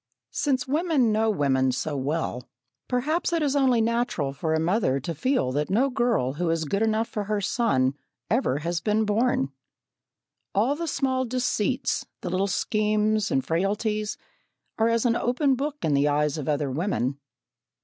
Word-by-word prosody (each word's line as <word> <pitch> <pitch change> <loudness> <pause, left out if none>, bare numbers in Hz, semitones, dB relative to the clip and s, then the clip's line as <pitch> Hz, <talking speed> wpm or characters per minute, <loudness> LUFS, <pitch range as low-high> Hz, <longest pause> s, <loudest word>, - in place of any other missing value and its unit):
Since 265 -3 0
women 295 -5 +2
know 220 +1 +2
women 135 -8 +2
so 150 +3 -3
well, 135 -3 -2 0.4
perhaps 300 +9 0
it 335 -2 +1
is 285 -1 +1
only 260 -4 +3
natural 225 - 0
for 160 +4 -1
a - - +1
mother 165 - +1
to 155 +6 -4
feel 160 - 0
that 145 +2 -1
no 250 +8 +2
girl 240 - +1
who 170 +3 -1
is 165 -1 0
good 200 +7 -1
enough 225 +1 +1
for 210 -1 -4
her 210 0 0
son 195 - +1 0.3
ever 225 - +1
has 165 +3 -2
been 215 0 +1
born. 210 - +1 1.0
All 235 +8 +2
the 335 +2 -4
small 260 -3 0
deceits, 250 +1 -1 0.2
the 180 - -4
little 190 +2 +1
schemes 215 +1 +1
and 135 - 0
frailties, 210 +5 -1 0.6
are 225 +1 +4
as 230 +1 +1
an 235 -1 +3
open 260 +4 +1
book 285 +3 -2
in 150 - +2
the 140 +1 +3
eyes 150 +1 +1
of 145 - -4
other 145 -2 0
women. 140 -4 -1
210 Hz, 170 wpm, -25 LUFS, 150-245 Hz, 1.0 s, are